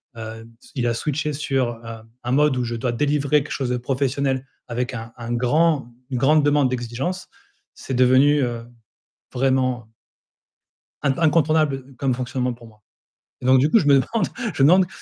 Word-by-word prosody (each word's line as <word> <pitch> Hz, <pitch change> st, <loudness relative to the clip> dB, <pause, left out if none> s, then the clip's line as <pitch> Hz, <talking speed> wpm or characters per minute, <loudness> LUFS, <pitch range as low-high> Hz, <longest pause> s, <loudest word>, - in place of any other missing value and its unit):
heu, 115 Hz, 0 st, -8 dB
s -, -, -18 dB
il 125 Hz, -3 st, 0 dB
a 120 Hz, -, +1 dB
switché 150 Hz, +5 st, -2 dB
sur, 130 Hz, -5 st, -2 dB
heu, 115 Hz, 0 st, -7 dB, 0.3 s
un 120 Hz, -, -3 dB
mode 145 Hz, +1 st, +3 dB
où 125 Hz, -, -1 dB
je 120 Hz, 0 st, -3 dB
dois 120 Hz, +1 st, -2 dB
délivrer 145 Hz, +2 st, +1 dB
quelque 150 Hz, -, -11 dB
chose 130 Hz, -3 st, -2 dB
de 125 Hz, -, 0 dB
professionnel 135 Hz, +1 st, -1 dB, 0.2 s
avec 125 Hz, +2 st, -2 dB
un 115 Hz, -1 st, -7 dB
un 120 Hz, 0 st, -5 dB
grand 135 Hz, +2 st, +1 dB, 0.2 s
une 130 Hz, -, -2 dB
grande 150 Hz, +4 st, +3 dB
demande 145 Hz, -2 st, +3 dB
d'exigence, 130 Hz, +9 st, -4 dB, 0.5 s
c'est 135 Hz, -, -7 dB
devenu, 130 Hz, +4 st, +4 dB
heu, 120 Hz, -2 st, -3 dB, 0.7 s
vraiment 130 Hz, -3 st, 0 dB, 1.1 s
in 140 Hz, -2 st, 0 dB
incontournable, 155 Hz, -2 st, +3 dB
heu, 135 Hz, 0 st, -15 dB
comme 135 Hz, 0 st, 0 dB
fonctionnement 125 Hz, 0 st, -2 dB
pour 120 Hz, 0 st, -14 dB
moi, 110 Hz, -1 st, -20 dB, 0.6 s
donc 130 Hz, +1 st, +5 dB
du 145 Hz, +4 st, +2 dB
coup, 225 Hz, -, +6 dB
je 165 Hz, -, -1 dB
me 140 Hz, -, +6 dB
demande 225 Hz, -, -1 dB, 0.3 s
je -, -, 0 dB
me 140 Hz, -, +7 dB
demande: 185 Hz, +2 st, +5 dB
130 Hz, 180 wpm, -22 LUFS, 120-145 Hz, 1.1 s, me